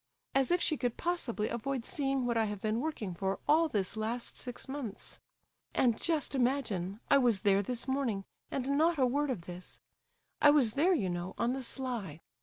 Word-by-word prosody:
As 270 -1 +3
if 350 +1 +3
she 310 -3 +2
could 245 -2 -1
possibly 270 -11 -1
avoid 245 +1 -3
seeing 270 -3 0
what 240 -1 0
I 225 -1 +3
have 210 -1 -4
been 215 +2 0
working 260 - -3
for 190 +2 -1
all 315 +2 +4
this 200 -5 -1
last 225 +3 -3
six 245 +1 -6
months! 265 -6 -6 0.6
And 235 -4 +2
just 320 -4 0
imagine, 235 -8 0
I 280 - +7
was 235 -7 +3
there 200 -1 +4
this 240 +5 -2
morning 255 -8 -1 0.2
and 275 +1 -1
not 330 +1 +3
a 260 - +4
word 285 +4 +1
of 245 -9 -2
this! 180 +1 -9 0.6
I 295 - +8
was 275 -7 +4
there, 345 +8 +4
you 190 - 0
know, 175 +1 -4
on 235 +2 +1
the 270 - -3
sly. 235 - -3
245 Hz, 195 wpm, -32 LUFS, 210-280 Hz, 0.6 s, I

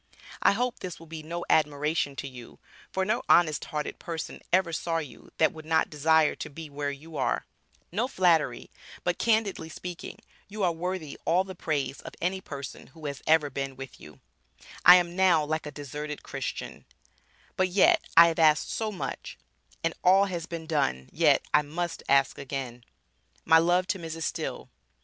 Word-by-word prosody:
I - - +5
hope 245 +3 -1
this 180 -2 -6
will 165 - -12
be 160 -1 -8
no 170 +3 -5
admiration 150 -1 +1
to 140 - -5
you 125 -3 -11 0.3
for 190 0 0
no 215 - 0
honest 155 -3 +4
hearted 150 -1 -4
person 165 -2 -6
ever 180 -2 +3
saw 165 +1 -1
you 150 -7 -7
that 160 - +3
would 160 - -10
not 160 +1 +1
desire 160 +1 +3
to - - -6
be 155 +1 -9
where 145 0 -2
you 150 +3 -8
are, 135 - 0 0.5
No 220 +8 0
flattery, 175 - +1 0.3
but - - -1
candidly 220 -7 +1
speaking, 175 +1 -7 0.3
you 205 0 -4
are 175 - +3
worthy 170 -3 -4
all 180 +3 +3
the 190 0 -8
praise 145 -6 -2
of - - -10
any 190 +2 -1
person 140 -6 -8
who 155 +2 -13
has 140 -2 -4
ever 155 -2 +4
been 135 0 -4
with 135 -1 -10
you, 75 -2 -13 0.6
I 180 - +11
am 175 -1 +1
now 180 -5 +4
like 155 0 -2
a - - -6
deserted 150 +1 -6
Christian, 135 -3 -6 0.7
but 185 - +2
yet 325 - +4
I 170 0 +10
have 165 - -3
asked 155 -1 +4
so 220 -1 -2
much, 195 - -6 0.5
and 165 0 +1
all 190 +2 +6
has 175 -3 -4
been 165 -1 -6
done 140 - -1
yet - - +3
I 150 - +6
must 165 +3 -4
ask 135 0 +3
again, 130 -3 -6 0.6
My 160 0 +7
love 175 +2 +3
to 195 - 0
Mrs. 165 -1 -5
Still. - - -4
160 Hz, 180 wpm, -28 LUFS, 145-180 Hz, 0.7 s, I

